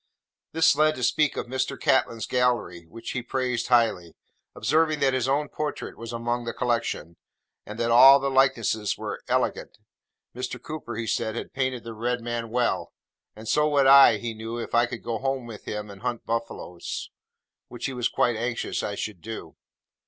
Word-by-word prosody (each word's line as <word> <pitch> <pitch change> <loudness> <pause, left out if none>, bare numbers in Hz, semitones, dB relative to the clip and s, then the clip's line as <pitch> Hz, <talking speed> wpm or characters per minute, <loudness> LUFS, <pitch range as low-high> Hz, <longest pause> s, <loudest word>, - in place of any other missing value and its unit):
This 160 -2 +4
led 155 +1 +3
us - - -11
to 125 - -4
speak 150 +5 +2
of - - -2
Mr. 130 +2 -3
Catlin's 115 -4 +1
gallery, 120 -9 0
which 115 +6 -8
he 125 - -2
praised 125 -1 -2
highly: 115 -9 +2 0.4
observing 155 +2 +2
that 135 -1 +3
his 130 -1 0
own 145 +2 +1
portrait 150 +1 -5
was 115 0 -8
among 120 +1 -2
the 115 - -4
collection, 115 -9 -2 0.5
and 105 - -7
that 115 0 0
all 135 +4 +9
the 135 0 -1
likenesses 120 -6 +2
were - - -5
'elegant.' - - -1 0.6
Mr. 125 0 -4
Cooper, 145 -7 -7
he 115 +1 -3
said, 110 0 -1
had - - -6
painted 130 -2 -2
the 115 - -7
Red 120 +3 -1
Man 120 -1 -4
well; 120 +1 -1 0.4
and 110 +1 -11
so 150 +7 +3
would 140 -2 +3
I, 135 -4 +8
he 115 +2 -4
knew, 115 +2 -6
if 120 - -6
I 120 0 +4
would 120 -2 -7
go 115 -2 -3
home 135 -1 -2
with 115 -3 -10
him 105 -1 -5
and 100 0 -13
hunt 120 -1 -3
buffaloes, 115 -6 -4 0.6
which 120 - -7
he 135 - -2
was 125 -1 0
quite 120 -1 +1
anxious 120 +2 -2
I 100 - -3
should 100 -4 -5
do. 115 +3 -8
120 Hz, 190 wpm, -26 LUFS, 115-130 Hz, 0.6 s, all